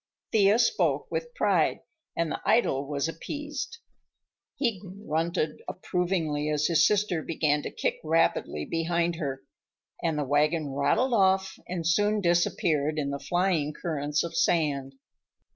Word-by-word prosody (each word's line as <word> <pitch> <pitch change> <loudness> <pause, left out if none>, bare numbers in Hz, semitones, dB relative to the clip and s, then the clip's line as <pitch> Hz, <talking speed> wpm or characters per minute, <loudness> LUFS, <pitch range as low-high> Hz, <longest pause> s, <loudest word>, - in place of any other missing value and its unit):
Thea 205 0 +5
spoke 235 - +1
with 485 0 -4
pride, - - +2 0.4
and 165 -2 0
the - - -4
idol 170 - +2
was 145 +1 -1
appeased. 295 - -5 0.8
He 235 -8 0
grunted 170 -5 -3
approvingly 170 -5 -1
as 150 0 +1
his 160 -1 +4
sister 205 -5 +1
began 150 -2 0
to - - -5
kick - - -2
rapidly 155 - +1
behind 170 0 0
her, 135 -5 -4 0.6
and 165 -3 0
the 150 - 0
wagon 150 +1 +1
rattled 240 - +1
off 190 -2 +3
and 175 -2 -4
soon 205 +5 +2
disappeared 165 -4 +1
in 140 -2 -1
the 140 - -4
flying 170 0 0
currents 150 -2 -1
of 170 -1 -6
sand. 145 -5 +1
165 Hz, 135 wpm, -27 LUFS, 150-190 Hz, 0.8 s, Thea